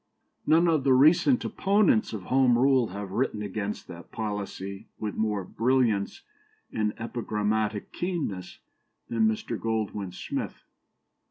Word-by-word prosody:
None 165 +2 +5
of 160 -5 +2
the 135 -1 +4
recent 165 - +5
opponents 195 - +2
of 105 -4 -5
Home 130 +1 +3
Rule 130 -1 +4
have 100 0 -6
written 105 -1 -1
against 105 +1 -4
that 85 0 -11
policy 100 -2 -5
with 105 -1 -3
more 105 -3 -1
brilliance 115 -1 0 0.5
and 105 -1 0
epigrammatic 110 -2 -2
keenness 150 - -3 0.5
than 115 -1 +2
Mr. 110 +1 -2
Goldwin 110 -4 -2
Smith. - - -5
110 Hz, 120 wpm, -27 LUFS, 105-130 Hz, 0.5 s, None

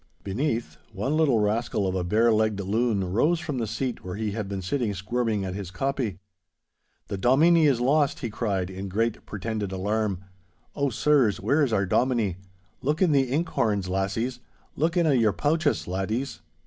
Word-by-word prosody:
Beneath, 115 - -2 0.2
one 120 +10 -1
little 155 -7 +3
rascal 105 0 0
of 95 - 0
a 95 -1 -1
bare 110 +6 +3
legged 110 -1 +1
loon 100 -2 0
rose 160 - +3
from 150 -6 -3
the 115 - -1
seat 125 +3 -3
where 90 -1 -5
he 110 0 -2
had 105 -1 -4
been 95 -2 -4
sitting 110 0 -1
squirming 105 +1 -1
at 95 - -4
his 100 -2 -5
copy. 120 0 -2 0.9
'The 100 - -4
Dominie 155 - +5
is 135 -5 +2
lost!' 140 +3 +2
he 120 - -3
cried 100 -4 -2
in 95 +1 -6
great 115 +4 -1
pretended 105 0 -3
alarm. 100 +1 -1 0.6
'Oh, 140 -1 +1
sirs, 130 -5 +2
where 145 +3 +2
is 135 - 0
our 100 -2 +2
Dominie? 115 -3 +1 0.4
Look 150 +4 0
in 185 -4 +4
the 135 -3 +3
ink 155 +7 0
horns, 100 -4 0
lassies. 100 +7 -1 0.4
Look 165 +5 0
in 170 - +3
a' 155 - +4
your 115 -5 +3
pouches, 155 0 0
laddies! 105 +9 -2
110 Hz, 180 wpm, -26 LUFS, 100-135 Hz, 0.9 s, Dominie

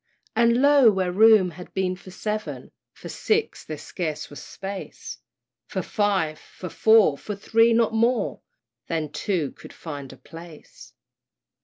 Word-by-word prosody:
And 235 +3 +3
lo! 285 -4 +7
where 190 -2 -1
room 210 -2 +5
had 180 +2 -12
been 185 -1 0
for 185 - -14
seven, 215 +3 -5 0.2
For - - -11
six 445 +1 -1
there 155 - -6
scarce 155 -2 -5
was 145 - -9
space! 195 0 -8 0.5
For 190 - -3
five! 190 -8 0
for 180 - -10
four! 220 -10 +4
for 210 - -5
three! 225 +3 +3
not 230 -1 +2
more 230 0 +1 0.5
Than 160 -3 -2
two 170 -4 -2
could - - -14
find 145 -5 -8
a - - -13
place! 165 -1 -13
195 Hz, 145 wpm, -24 LUFS, 165-225 Hz, 0.5 s, lo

